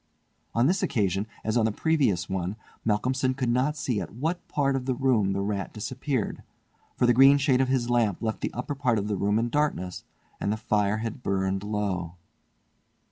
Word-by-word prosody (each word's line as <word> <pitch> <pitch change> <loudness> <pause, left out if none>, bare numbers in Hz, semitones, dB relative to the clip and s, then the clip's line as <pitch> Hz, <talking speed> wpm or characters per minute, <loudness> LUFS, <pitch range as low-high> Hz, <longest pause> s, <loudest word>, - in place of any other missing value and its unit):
On 115 +2 +4
this 185 +7 +2
occasion, 100 -1 0 0.2
as 110 +1 -1
on 115 -2 +3
the 110 - +2
previous 130 - +1
one, 95 +1 -2 0.3
Malcolmson 130 +4 +1
could 130 -3 -1
not 135 +5 +1
see 120 -8 -1
at - - -8
what 160 +8 -2
part 140 -2 +1
of 130 -1 -3
the 130 - +1
room 120 -7 +2
the 100 - -1
rat 100 -1 -2
disappeared, 130 +2 -3 0.6
for - - +3
the 120 - +5
green 135 +3 +7
shade 135 -2 +3
of 130 - +2
his 130 -2 +1
lamp 115 -6 +1
left 110 -1 -3
the - - -1
upper 125 +4 -4
part 130 -5 +1
of 100 0 -1
the 105 - -1
room 100 +2 +1
in 115 +1 0
darkness, 130 -11 -1 0.4
and 100 - -1
the 110 - -1
fire 105 -1 +1
had 115 +2 -5
burned 95 -2 -1
low. 100 -5 -2
115 Hz, 195 wpm, -27 LUFS, 100-130 Hz, 0.6 s, green